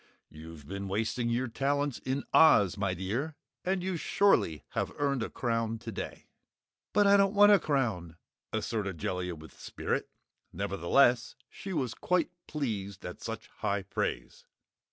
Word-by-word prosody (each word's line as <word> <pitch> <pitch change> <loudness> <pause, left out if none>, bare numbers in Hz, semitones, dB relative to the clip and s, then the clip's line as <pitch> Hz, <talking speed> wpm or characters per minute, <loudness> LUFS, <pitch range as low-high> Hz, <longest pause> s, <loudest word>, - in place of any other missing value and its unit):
You've 80 -2 -11
been 100 +2 -5
wasting 110 +4 -1
your 120 +2 0
talents 140 +2 -1
in 130 +2 -2
Oz, 105 - +6
my 100 -2 -1
dear, 115 - -3 0.3
and 185 0 0
you 185 -2 -1
surely 160 - +2
have - - -2
earned 140 -3 0
a 115 - -2
crown 115 -2 -1
today!" 115 -3 -7 0.7
"But 205 0 +4
I 200 0 +7
don't 195 +1 +3
want 205 +1 +8
a 205 - +7
crown!" 110 - -1 0.3
asserted 105 -5 -2
Jellia 90 +2 -3
with 80 0 -14
spirit. - - -3 0.4
Nevertheless 120 +7 +2 0.2
she 195 - -7
was 130 -9 -1
quite 180 -1 0 0.2
pleased 105 -10 -4
at 90 - -7
such 115 -1 -5
high 100 -2 0
praise. 95 - -4
115 Hz, 145 wpm, -30 LUFS, 95-145 Hz, 0.7 s, want